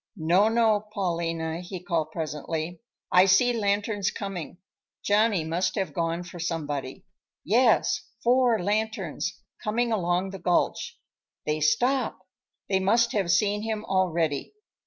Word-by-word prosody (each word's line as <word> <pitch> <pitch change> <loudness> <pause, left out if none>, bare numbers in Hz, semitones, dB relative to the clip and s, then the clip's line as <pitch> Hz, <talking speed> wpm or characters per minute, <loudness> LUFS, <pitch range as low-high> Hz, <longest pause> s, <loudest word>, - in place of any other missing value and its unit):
"No, 180 +6 +3
no, 220 -2 +2
Paulina," 165 -4 -2
he 180 +1 -7
called 170 -3 -1
presently; 160 +1 -4 0.3
"I 180 +1 +7
see 195 +6 +4
lanterns 205 -2 0
coming. 185 -5 -6 0.5
Johnny 210 -3 +3
must 165 +4 -1
have 190 -7 -2
gone 165 +2 -1
for 175 0 -10
somebody. 150 -6 -4 0.4
Yes, 230 +2 +3 0.2
four 245 -1 +4
lanterns, 205 -3 -2 0.2
coming 235 +3 0
along 185 -2 0
the 195 - -7
gulch. 175 0 0 0.5
They 150 0 0
stop; 245 - +1 0.5
they 190 -1 +2
must 230 +5 +3
have 195 -5 0
seen 205 +3 +2
him 220 -1 -3
already. 170 - 0
190 Hz, 125 wpm, -26 LUFS, 165-215 Hz, 0.5 s, I